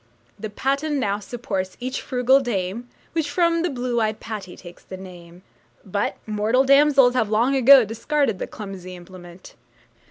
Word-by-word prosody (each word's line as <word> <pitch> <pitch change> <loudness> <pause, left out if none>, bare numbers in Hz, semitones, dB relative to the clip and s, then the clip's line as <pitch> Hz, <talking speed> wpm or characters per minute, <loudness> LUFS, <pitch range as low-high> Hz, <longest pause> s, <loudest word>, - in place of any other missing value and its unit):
The 215 +1 -5
patten 275 +6 -1
now 205 -4 -1
supports 195 -4 -5
each 255 +2 -4
frugal 255 +1 +3
dame, 235 -1 -3 0.2
Which 320 -3 -1
from 335 +2 +1
the 350 - 0
blue 245 -3 -2
eyed 215 0 -1
Patty 205 -5 -7
takes 175 -1 -13
the 185 - -9
name. 180 -1 -13 0.4
But 200 +1 -2
mortal 215 +4 +1
damsels 275 -2 +5
have 225 -5 0
long 235 +6 +2
ago 265 -1 +7
discarded 230 +1 -1
the - - -4
clumsy 190 -3 -9
implement. 175 0 -13
225 Hz, 155 wpm, -22 LUFS, 190-270 Hz, 0.4 s, ago